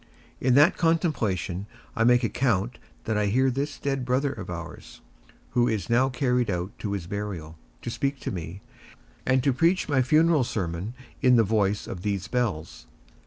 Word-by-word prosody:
In 125 -1 +3
that 150 +5 +5
contemplation 110 - 0 0.3
I 115 - +2
make 125 +1 +5
account 120 -2 0 0.2
that 110 -1 0
I 105 - +1
hear 130 +6 +2
this 140 +3 -3
dead 135 -2 -2
brother 130 +3 0
of - - -8
ours, - - -8 0.5
who 120 0 +3
is 110 -4 -2
now 130 +3 +4
carried 125 -3 0
out 90 +1 -2
to 100 -2 -3
his 95 -4 -3
burial, 95 -5 -5 0.3
to 120 - -3
speak 140 +2 -2
to - - -3
me, 85 +1 -6 0.7
and 130 0 +3
to 135 -1 +3
preach 165 +8 +2
my 145 -3 +3
funeral 155 +2 +4
sermon 95 0 -3 0.3
in 125 -1 +5
the 115 - +5
voice 105 -1 +1
of 90 - -6
these 100 -2 -2
bells. 105 -11 -2
120 Hz, 170 wpm, -26 LUFS, 100-130 Hz, 0.7 s, that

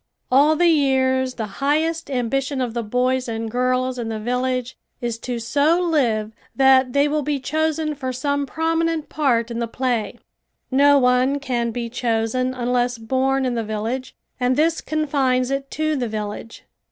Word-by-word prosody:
All 290 +4 +5
the 350 - +2
years 260 -4 +2
the 220 - -3 0.2
highest 315 +3 0
ambition 270 +2 -1
of 245 -3 -2
the 235 - -1
boys 250 +3 0
and 225 -1 -4
girls 255 +1 0
in 230 -1 -3
the 220 - -3
village 250 +2 -2 0.2
is 235 -2 -3
to 245 0 -4
so 285 +8 +2
live 245 -11 +1 0.2
that 265 -2 +4
they 280 +1 +3
will 300 +1 0
be 290 0 -1
chosen 315 +2 -1
for 265 -3 -4
some 285 +2 -1
prominent 325 0 -1
part 240 -6 +1
in 235 - -3
the 235 - -1
play. 245 -2 -2 0.5
No 285 +2 +5
one 255 +1 +3
can 245 -4 -1
be 235 +1 -4
chosen 235 +1 -1
unless 245 0 0
born 265 +3 0
in 250 - 0
the 230 -1 -1
village 220 +4 -4 0.2
and 250 0 +2
this 320 +3 +1
confines 275 -4 0
it 275 0 -2
to 310 0 -1
the 250 -4 -1
village. 210 +1 -6
255 Hz, 165 wpm, -21 LUFS, 240-285 Hz, 0.5 s, All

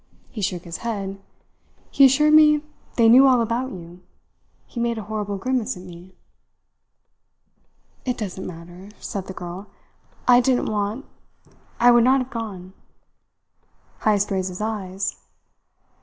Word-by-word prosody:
He 220 - -6
shook 180 -2 -2
his 170 -1 -6
head. 195 -4 -5 0.7
He 275 - +6
assured 300 +3 +4
me 300 -1 +6 0.3
they 230 -2 +4
knew 255 +4 +8
all 255 -2 +5
about 235 +3 -1
you. 175 -1 -11 0.6
He 240 - -8
made 235 -1 0
a 220 - -5
horrible 210 -1 -4
grimace 250 -1 -2
at 180 - -11
me." 180 +1 -13 1.9
"It 250 -2 -2
doesn't 190 -4 -5
matter," 175 +3 -11
said 195 -2 -5
the 190 - -6
girl. 180 +2 -8 0.6
"I 245 -1 +7
didn't 250 0 +1
want 210 +5 -2 0.7
I 245 +1 +6
would 240 -1 +5
not 260 +2 +4
have 255 0 -5
gone." 195 -6 -6 1.3
Heyst 205 -1 +1
raised 190 -1 -1
his 180 - -8
eyes. 200 -3 -3
210 Hz, 140 wpm, -22 LUFS, 185-245 Hz, 1.9 s, knew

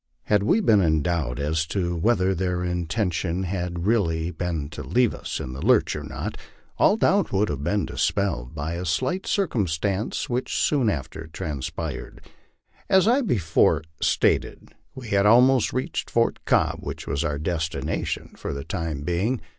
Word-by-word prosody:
Had 105 -1 +2
we 160 - +3
been 110 - +4
in 80 -4 +2
doubt 80 -8 -1
as 80 +3 -1
to 90 -2 -1
whether 95 +1 +2
their 90 -1 -1
intention 90 0 -1
had 90 -1 -3
really 85 -7 +1
been 80 -3 -3
to 75 -1 -7
leave 120 - +2
us - - -5
in 65 - -5
the 65 - -6
lurch - - +3
or - - -4
not, - - -5 0.4
all 210 - +5
doubt 200 -4 +2
would 100 +2 +1
have 70 -1 -3
been 100 +6 0
dispelled 80 -11 -1
by 75 +3 -3
a 85 +1 -4
slight 175 - -1
circumstance 100 - -1
which 125 +1 -2
soon 135 -7 +2
after 80 -1 -4
transpired. 75 -1 -5 0.7
As 190 +1 +5
I 250 +5 +4
before 85 - +2 0.2
stated, - - +1 0.2
we 125 -4 -8
had 100 0 +3
almost 125 +2 +5
reached 130 - -3
Fort 115 0 +1
Cobb, - - +2
which - - -6
was 70 +3 -1
our 75 -3 -1
destination 80 +1 -3
for - - -5
the 70 - -5
time 80 -3 -3
being. 95 - 0
90 Hz, 160 wpm, -24 LUFS, 80-110 Hz, 0.7 s, all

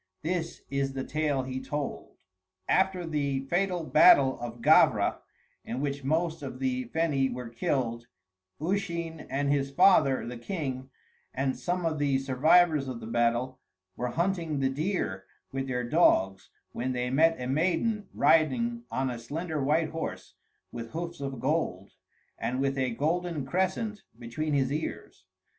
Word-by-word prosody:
This 170 0 -3
is 140 -1 -1
the 135 -1 -3
tale 150 -3 -1
he 130 0 -4
told: 145 -1 -5 0.5
After 190 -2 +2
the 140 -4 -1
fatal 175 +4 0
battle 140 -4 +6
of 120 0 -6
Gavra, - - +4 0.4
in 120 - -4
which 140 0 -3
most 160 +3 0
of 135 -3 -6
the 130 -1 -1
Feni 140 -1 0
were 125 -1 -6
killed, 115 0 -2 0.5
Usheen 170 -2 -3
and 140 +1 0
his 140 -1 +1
father, 140 -2 +4
the 120 0 -6
king, 130 -4 -4 0.5
and 130 0 0
some 180 0 -2
of 155 -2 -1
the 140 -2 +2
survivors 145 +3 +3
of 125 -3 -5
the - - -8
battle 120 +3 0 0.4
were 125 - -2
hunting 165 +1 -1
the 135 -1 +2
deer 145 - -2 0.3
with 135 0 -3
their 125 -1 -1
dogs, 95 - +3 0.2
when 130 +2 -2
they 125 0 -2
met 165 +3 +3
a 125 - -4
maiden 185 - 0
riding 235 +9 +2
on 130 -1 -1
a 120 - -5
slender 155 +5 -3
white 155 +3 +2
horse 160 0 -5 0.4
with 115 -1 -7
hoofs 170 -1 -5
of 135 -3 -4
gold, 130 - -1 0.5
and 130 +2 -2
with 135 0 0
a 130 -1 0
golden 155 +4 -1
crescent 190 - -1 0.2
between 145 +6 -3
his 135 -1 +1
ears. 155 +2 -5
140 Hz, 150 wpm, -28 LUFS, 130-165 Hz, 0.5 s, battle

